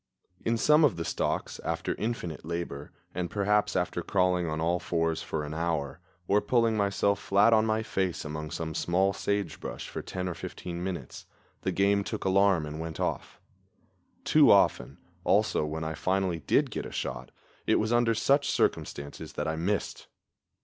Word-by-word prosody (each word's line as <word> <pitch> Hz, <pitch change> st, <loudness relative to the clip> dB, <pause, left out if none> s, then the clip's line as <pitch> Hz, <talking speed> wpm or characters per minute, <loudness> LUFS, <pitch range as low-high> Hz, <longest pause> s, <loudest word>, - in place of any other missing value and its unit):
In 115 Hz, 0 st, +1 dB
some 150 Hz, +6 st, +5 dB
of 145 Hz, -, +4 dB
the 85 Hz, 0 st, -4 dB
stalks, -, -, -2 dB
after -, -, -2 dB
infinite 105 Hz, -8 st, -4 dB
labor, 85 Hz, -3 st, -5 dB, 0.2 s
and 90 Hz, -1 st, -2 dB
perhaps 105 Hz, 0 st, +1 dB
after 90 Hz, -1 st, 0 dB
crawling 90 Hz, -1 st, +1 dB
on 80 Hz, 0 st, -2 dB
all 85 Hz, +2 st, +1 dB
fours 80 Hz, -2 st, -1 dB
for 75 Hz, -1 st, -3 dB
an 75 Hz, +1 st, -5 dB
hour, 80 Hz, -3 st, -2 dB, 0.3 s
or 105 Hz, +1 st, +3 dB
pulling 115 Hz, +1 st, +2 dB
myself 100 Hz, -1 st, +1 dB
flat 100 Hz, +4 st, +4 dB
on 110 Hz, 0 st, +4 dB
my 110 Hz, 0 st, +1 dB
face 95 Hz, -6 st, -2 dB
among 75 Hz, 0 st, -5 dB
some 80 Hz, 0 st, -4 dB
small 95 Hz, +4 st, +1 dB
sagebrush 100 Hz, -5 st, -3 dB
for -, -, -5 dB
ten 90 Hz, 0 st, -4 dB
or 90 Hz, -, -2 dB
fifteen 85 Hz, +1 st, -6 dB
minutes, 95 Hz, -2 st, -6 dB, 0.3 s
the -, -, -1 dB
game 100 Hz, +1 st, +2 dB
took -, -, -5 dB
alarm 95 Hz, -3 st, +3 dB
and 75 Hz, +1 st, -6 dB
went 80 Hz, -1 st, -5 dB
off. -, -, -3 dB, 0.8 s
Too -, -, +5 dB
often, -, -, +4 dB, 0.3 s
also, -, -, +2 dB
when 80 Hz, +1 st, -4 dB
I 80 Hz, 0 st, -3 dB
finally 95 Hz, 0 st, 0 dB
did -, -, +1 dB
get -, -, -4 dB
a -, -, -10 dB
shot, 65 Hz, -1 st, -4 dB, 0.4 s
it -, -, +4 dB
was 110 Hz, +2 st, +1 dB
under 120 Hz, -1 st, +3 dB
such 140 Hz, +5 st, +2 dB
circumstances 70 Hz, +2 st, -2 dB
that 75 Hz, -, -3 dB
I 80 Hz, -, -1 dB
missed. 95 Hz, +5 st, -2 dB
90 Hz, 170 wpm, -28 LUFS, 80-100 Hz, 0.8 s, some